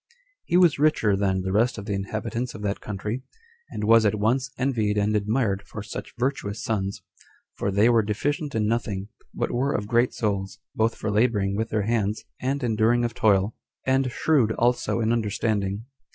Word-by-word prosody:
He 175 - +2
was 175 -6 +5
richer 145 -9 +3
than 95 -1 0
the 95 - -2
rest 115 +5 +2
of 105 - -6
the 105 - -2
inhabitants 110 +5 -3
of 105 - -8
that 100 0 -2
country; 105 +4 -4 0.5
and 105 - -5
was 115 +1 +6
at 105 0 +2
once 120 +6 +1
envied 115 -6 0
and 105 +1 +1
admired 105 -1 +1
for 105 - -7
such - - -7
virtuous 120 -5 -2
sons, 100 -3 -2 0.5
for - - -2
they 100 +3 +4
were 115 -2 +5
deficient 140 +8 -2
in 110 -1 +1
nothing, 105 -3 -2 0.2
but - - -2
were 135 +4 0
of 105 - -2
great 120 +3 +2
souls, 100 -4 -2 0.2
both 110 +1 +1
for 105 - -3
laboring 105 -3 +2
with 110 +2 -2
their 105 -1 0
hands 105 -1 -1 0.2
and 135 +2 -1
enduring 115 +1 +2
of 115 - -3
toil; 100 -1 +2 0.3
and 130 -1 +2
shrewd 130 -5 +2
also 120 0 +1
in 110 +1 +2
understanding. 105 -2 -1
110 Hz, 180 wpm, -25 LUFS, 100-120 Hz, 0.5 s, was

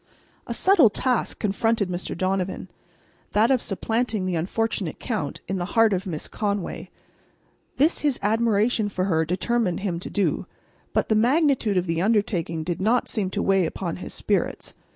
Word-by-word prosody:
A - - -2
subtle 370 - +5
task 250 +3 0
confronted 215 0 0
Mr. 180 -1 -4
Donovan,—that 185 +2 -2
of 255 -3 +3
supplanting 220 0 -1
the 185 - -1
unfortunate 195 +1 -1
Count 220 -4 -3
in 190 - -2
the 175 - -2
heart 225 -2 +5
of 190 +1 -2
Miss 155 -4 -4
Conway. 200 -3 -3 0.9
This 305 +5 +3
his 290 -4 +1
admiration 220 0 +2
for 185 -2 -1
her 160 -4 +1
determined 185 +3 0
him 180 -4 -2
to - - -7
do. 200 -2 0 0.4
But - - 0
the - - +4
magnitude 245 - +2
of 180 - +1
the 165 -1 -1
undertaking 185 -6 0
did 175 +2 -3
not 230 +5 +2
seem 200 -4 -1
to - - -2
weigh 195 -3 +3
upon 170 0 -4
his - - -7
spirits. - - -1
200 Hz, 160 wpm, -24 LUFS, 180-225 Hz, 0.9 s, subtle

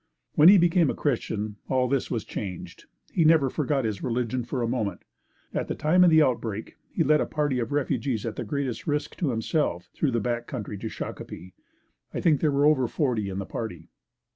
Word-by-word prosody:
When 155 +3 +8
he 200 - +9
became 170 -3 +4
a - - -1
Christian 110 -6 -2
all 130 -1 +2
this 135 0 0
was 115 -3 -2
changed. 95 -4 -7 0.3
He 170 - +3
never 155 -4 +4
forgot 140 -4 0
his 105 -3 -2
religion 125 0 -1
for 120 +1 -3
a - - 0
moment. 110 -6 -2 0.5
At - - -2
the - - -3
time 175 +4 +4
of 180 - +7
the 160 -1 +6
outbreak 115 -5 -2
he 165 - 0
led 150 0 +4
a - - -1
party 145 -4 0
of 115 -1 -3
refugees 135 -5 -1
at 115 - -3
the - - -4
greatest 140 -6 -3
risk 150 0 -1
to 165 - 0
himself 115 - -1
through 150 - 0
the 120 - +2
back 120 +2 -2
country 105 -5 -5
to 110 - -4
Shakopee. 90 -3 -7 0.6
I - - -1
think 155 -5 +3
there 155 - +3
were 140 +1 +2
over 140 -5 +4
forty 115 -8 -1
in 95 - -5
the 100 - -3
party. 90 -8 -6
130 Hz, 210 wpm, -26 LUFS, 110-150 Hz, 0.6 s, he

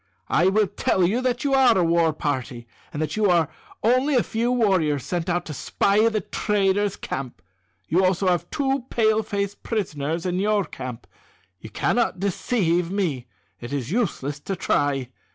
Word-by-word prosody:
I 175 - +3
will 210 +2 +3
tell 185 -1 0
you 220 +8 +1
that 250 +1 -1
you 280 -1 +1
are 260 -5 +5
a 180 - +3
war 165 -1 +3
party, 130 -5 -3 0.3
and 145 - -5
that 155 -1 -3
you 215 -2 +2
are 170 -3 +3 0.3
only 255 +5 +3
a 245 - +4
few 235 +2 -1
warriors 185 - +2
sent 175 0 -2
out 175 0 0
to 155 - -6
spy 205 +9 +2
the 215 -2 -1
traders' 205 0 0
camp. 135 -3 -6 0.5
You 170 - +2
have 190 - +4
also 185 0 +2
two 270 -3 -1
Pale 220 -1 +2
face 200 -2 -2
prisoners 165 -7 -3
in 180 0 -1
your 205 -1 +1
camp. 125 -2 -8 0.5
You 110 - -10
cannot 235 - 0
deceive 180 -3 0
me. 165 -11 -2 0.3
It 120 - -8
is 140 -1 -3
useless 150 - -1
to 195 +6 -4
try. 145 -7 0
190 Hz, 170 wpm, -23 LUFS, 155-215 Hz, 0.5 s, are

